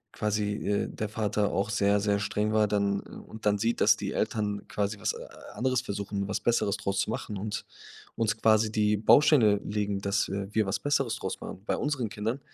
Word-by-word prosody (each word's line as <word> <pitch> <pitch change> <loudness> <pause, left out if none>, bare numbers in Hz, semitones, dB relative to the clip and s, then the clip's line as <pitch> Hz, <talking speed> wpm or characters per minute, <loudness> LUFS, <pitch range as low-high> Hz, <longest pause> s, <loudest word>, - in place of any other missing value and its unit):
quasi, 105 -1 0
äh, 100 -2 -1
der 110 -1 -4
Vater 105 -1 0
auch 100 +2 -1
sehr, 100 0 +3
sehr 100 0 +1
streng 105 +1 -1
war 105 -1 +4
dann, 100 -1 0
äh - - -14 0.2
und 110 0 -10
dann 105 0 +3
sieht, 115 +3 0
dass 105 0 +6
die 100 -1 -4
Eltern 105 -2 -2
quasi 105 0 -2
was, - - 0
äh, - - -8 0.3
anderes 130 0 +1
versuchen, 100 -3 -4
was 105 - -1
Besseres 110 -4 +1
draus 100 0 -2
zu - - 0
machen 110 -1 -4
und 105 +2 -4 0.5
uns 110 -1 0
quasi 110 -1 +4
die 105 -1 +2
Bausteine 110 -1 +5
legen, 100 -1 -1
dass, 100 0 0
äh, 100 0 -3
wir 110 -3 +2
was 100 - -1
Besseres 135 -4 0
draus - - -5
machen 95 - -8
bei - - 0
unseren 135 -7 -1
Kindern, 115 +4 -3
105 Hz, 205 wpm, -28 LUFS, 100-110 Hz, 0.5 s, dass